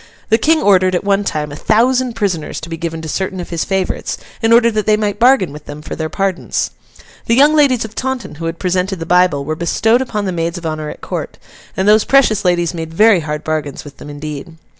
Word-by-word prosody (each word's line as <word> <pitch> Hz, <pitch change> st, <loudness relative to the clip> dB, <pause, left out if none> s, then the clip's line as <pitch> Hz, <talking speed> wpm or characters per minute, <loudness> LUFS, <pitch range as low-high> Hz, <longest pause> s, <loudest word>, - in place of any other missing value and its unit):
The 225 Hz, +1 st, +4 dB
King 315 Hz, +5 st, +2 dB
ordered, 185 Hz, -2 st, +4 dB
at 180 Hz, -, -1 dB
one 200 Hz, 0 st, +1 dB
time, 150 Hz, -6 st, -3 dB
a -, -, -7 dB
thousand 245 Hz, -, +2 dB
prisoners 190 Hz, -8 st, -2 dB
to 160 Hz, -, -8 dB
be 165 Hz, -, -4 dB
given 165 Hz, -1 st, -5 dB
to -, -, -5 dB
certain 190 Hz, +3 st, -3 dB
of 175 Hz, -, -7 dB
his 170 Hz, -1 st, -1 dB
favourites, 190 Hz, -2 st, -2 dB, 0.2 s
in 225 Hz, 0 st, +2 dB
order 235 Hz, 0 st, +5 dB
that 215 Hz, -1 st, -2 dB
they 215 Hz, 0 st, +4 dB
might 210 Hz, -1 st, -2 dB
bargain 240 Hz, -, +4 dB
with 150 Hz, 0 st, -11 dB
them 145 Hz, +1 st, -9 dB
for -, -, -6 dB
their 160 Hz, -1 st, -3 dB
pardons. 195 Hz, 0 st, -2 dB, 0.6 s
The 230 Hz, -, +3 dB
young 290 Hz, +4 st, +5 dB
ladies 275 Hz, -7 st, +3 dB
of 220 Hz, -, -10 dB
Taunton 260 Hz, -5 st, -4 dB
who -, -, -3 dB
had 165 Hz, +1 st, -4 dB
presented 185 Hz, +1 st, -1 dB
the 165 Hz, -, -6 dB
Bible, 180 Hz, -5 st, +2 dB
were 155 Hz, -, -2 dB
bestowed 220 Hz, +8 st, +1 dB
upon 215 Hz, -5 st, -3 dB
the 190 Hz, -, -1 dB
maids 170 Hz, 0 st, -2 dB
of 175 Hz, -, -8 dB
honour 155 Hz, -1 st, -3 dB
at -, -, -10 dB
court; -, -, -5 dB, 0.4 s
and 190 Hz, +1 st, 0 dB
those 210 Hz, +1 st, +5 dB
precious 265 Hz, -7 st, +3 dB
ladies 175 Hz, -2 st, +1 dB
made 165 Hz, -1 st, -5 dB
very 210 Hz, +3 st, +5 dB
hard 150 Hz, -1 st, -4 dB
bargains 155 Hz, -3 st, -3 dB
with 145 Hz, -2 st, -12 dB
them -, -, -10 dB
indeed. 150 Hz, +2 st, -7 dB
185 Hz, 235 wpm, -16 LUFS, 160-220 Hz, 0.6 s, order